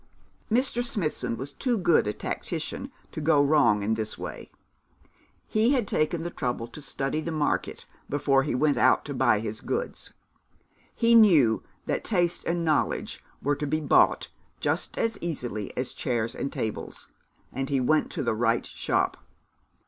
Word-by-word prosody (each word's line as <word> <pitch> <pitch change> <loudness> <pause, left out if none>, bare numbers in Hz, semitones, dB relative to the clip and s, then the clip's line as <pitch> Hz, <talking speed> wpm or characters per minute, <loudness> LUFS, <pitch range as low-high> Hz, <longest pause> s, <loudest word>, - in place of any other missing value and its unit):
Mr. 245 +1 +2
Smithson 150 - -2
was 140 +2 -7
too 245 - 0
good 175 - +3
a - - +1
tactician - - -4 0.2
to - - -5
go 150 -1 +4
wrong 140 -8 +4
in 110 +2 +1
this 110 -1 -3
way. - - -7 1.0
He 225 +5 +3
had 245 -7 +1
taken 160 +1 0
the 175 - -4
trouble 120 -5 -3
to 150 - -10
study 140 +2 -2
the 165 - -4
market 155 -2 -1 0.2
before 135 -1 +2
he 135 -2 -1
went 145 +2 +2
out 130 - +4
to 145 - -4
buy 120 -5 +3
his 110 -1 -5
goods. 480 +3 -4 0.8
He 235 0 +3
knew 165 - +6 0.2
that - - -1
taste 175 -4 0
and 170 0 0
knowledge 155 -2 0 0.2
were 145 +1 +2
to 150 - -3
be 155 +2 0
bought 150 - +3 0.3
just - - -1
as 230 0 0
easily 120 - -3
as 125 0 -2
chairs 115 -3 -1
and 140 - -4
tables, 110 - -5 0.5
and 135 +1 -3
he 140 -2 +2
went 155 +5 +2
to 155 - -2
the 120 - +1
right 115 +1 +1
shop. - - -1
145 Hz, 165 wpm, -27 LUFS, 125-170 Hz, 1.0 s, knew